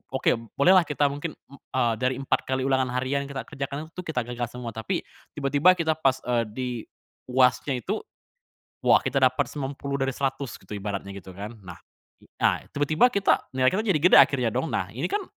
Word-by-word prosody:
oke 130 - +2
b 115 - -1
boleh 170 +7 +5
lah 175 - +4
kita 145 -1 +1
mungkin 145 +2 -5 0.2
m 140 - -12
eee, 120 -3 0
dari 130 +1 +1
4 135 +1 -1
kali 130 0 0
ulangan 130 -1 +2
harian 135 +2 -1
kita 135 -1 -5
kerjakan 140 +3 -6
itu 180 - -7
kita 125 -6 -1
gagal 120 0 -4
semua. 120 0 -7
Tapi, 110 0 -3 0.3
tiba-tiba 145 +6 +4
kita 165 -2 +1
pas, 135 -4 +1
eee, 120 -1 +1
di 125 +4 -4 0.6
UAS-nya 130 +2 +3
itu, - - -2 0.9
wah - - +6
kita - - 0
dapat - - +3
90 140 0 -4
dari 135 0 0
100 135 -2 -2
gitu - - -22
ibaratnya 100 -1 -4
gitu 95 0 -12
kan. 105 +4 -8
Nah, 90 - -9 0.6
a - - +3
tiba-tiba 155 - +3
kita 200 -2 +1
nilai 130 0 +4
kita 215 - +1
jadi 190 -7 +3
gede 180 - +7
akhirnya - - +1
dong. - - -1
Nah, - - -1
ini - - -1
kan 410 0 0
135 Hz, 195 wpm, -26 LUFS, 125-145 Hz, 0.9 s, gede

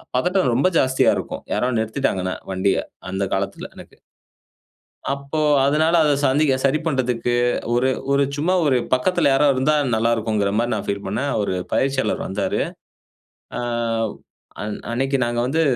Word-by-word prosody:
பதட்டம் 180 +1 +2
ரொம்ப 140 +9 +3
ஜாஸ்தியா 130 0 +3
இருக்கும், - - -6
யாரோ 125 - +1
நிறுத்திட்டாங்கனா, 110 -5 -1 0.2
வண்டிய, 95 +1 +1 0.3
அந்த 95 +1 -1
காலத்தில 95 0 -4
எனக்கு. - - -13 1.2
அப்போ 140 +2 -4 0.3
அதனால 155 +4 +2
அதை 150 - +3
சந்திக்க 140 +1 +3
சரி 135 +2 +3
பண்றதுக்கு, 125 -5 0 0.4
ஒரு 125 +2 +2 0.2
ஒரு 140 0 +3
சும்மா 165 +6 +1
ஒரு 135 -3 +3 0.2
பக்கத்துல 150 +5 +2
யாராவது 140 +1 +4
இருந்தால் 145 +1 +2
நல்லா 115 +1 +1
இருக்கும்ங்கிற 110 -3 0
மாதிரி 120 +1 0
நான் 105 - -4
பீல் 100 0 -3
பண்ணேன். 120 +9 -2
அவரு 100 -3 -1 0.2
பயிற்சியாளர் 135 0 0
வந்தாரு. - - -2 1.0
ஆ - - -2 1.0
அன் 105 0 -4
அன்னைக்கு 135 +3 0
நாங்க 120 0 -2
வந்து, 150 +6 +1
130 Hz, 140 wpm, -21 LUFS, 110-140 Hz, 1.2 s, யாராவது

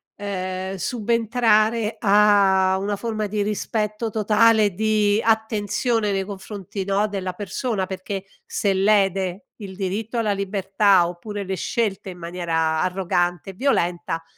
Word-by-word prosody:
ehm, 190 -1 -4
subentrare 225 0 +1
a 195 -2 +4
una 205 +1 -1
forma 215 0 -3
di 210 +1 -2
rispetto 210 +1 -2
totale 220 +1 +4
e 195 - -5
di 215 +1 +2
attenzione 220 0 0
nei 195 0 0
confronti, 195 0 -7
no, 200 +2 +1
della 190 -2 -4
persona, 205 +2 -3
perché 190 +1 -5 0.2
se 200 - 0
lede 195 +1 +1
il 195 -4 -9
diritto 205 +5 -3
alla 215 -3 +1
libertà, 195 -2 +2
oppure 200 +4 -6
le 190 0 -4
scelte 205 -1 -2
in 180 - -12
maniera 165 -2 -1
arrogante 180 -1 -1
e - - -7
violenta, 175 -8 -1
200 Hz, 130 wpm, -22 LUFS, 190-215 Hz, 0.2 s, a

